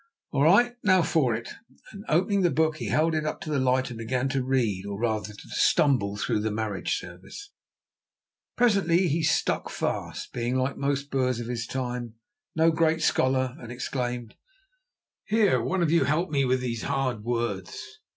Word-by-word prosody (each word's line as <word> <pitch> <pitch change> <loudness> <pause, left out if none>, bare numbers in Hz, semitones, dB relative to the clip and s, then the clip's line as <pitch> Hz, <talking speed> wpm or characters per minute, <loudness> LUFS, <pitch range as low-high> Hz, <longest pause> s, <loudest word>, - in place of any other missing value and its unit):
"All 140 - 0
right, 210 +11 +5
now 185 -3 +4
for 150 -8 +2
it," 115 +1 -6 0.4
and, 200 -2 -10
opening 190 +5 +2
the 175 - +4
book, 160 -1 +1
he - - -4
held 160 +2 +2
it 155 -1 0
up 155 - -3
to 155 - -5
the 145 - +1
light, 130 0 +1
and 115 - -8
began 125 +3 -1
to 135 -1 -1
read, 120 -8 0
or, 100 0 -5
rather, 110 -3 -1
to 100 - -13
stumble, 105 -8 +2
through 105 - 0
the 110 +1 -1
marriage 105 -2 -2
service. 95 - -10 1.0
Presently 195 -6 +3
he 160 +3 0
stuck 155 - 0
fast, - - -4
being, 120 +1 -1
like 130 +1 0
most 140 0 -2
Boers 130 -3 0
of 120 - -4
his 115 -1 -4
time, 125 -3 -4 0.4
no 160 +1 +4
great 160 0 +1
scholar, 130 -1 +1
and 120 -1 -9
exclaimed: 120 -2 -4 0.9
"Here, 205 - +3
one 175 +10 0
of 160 - +1
you 165 -5 +4
help 155 +4 0
me 140 -2 +2
with 130 0 +1
these 120 -3 -3
hard 135 -6 -1
words." 120 - -4
130 Hz, 180 wpm, -26 LUFS, 120-160 Hz, 1.0 s, right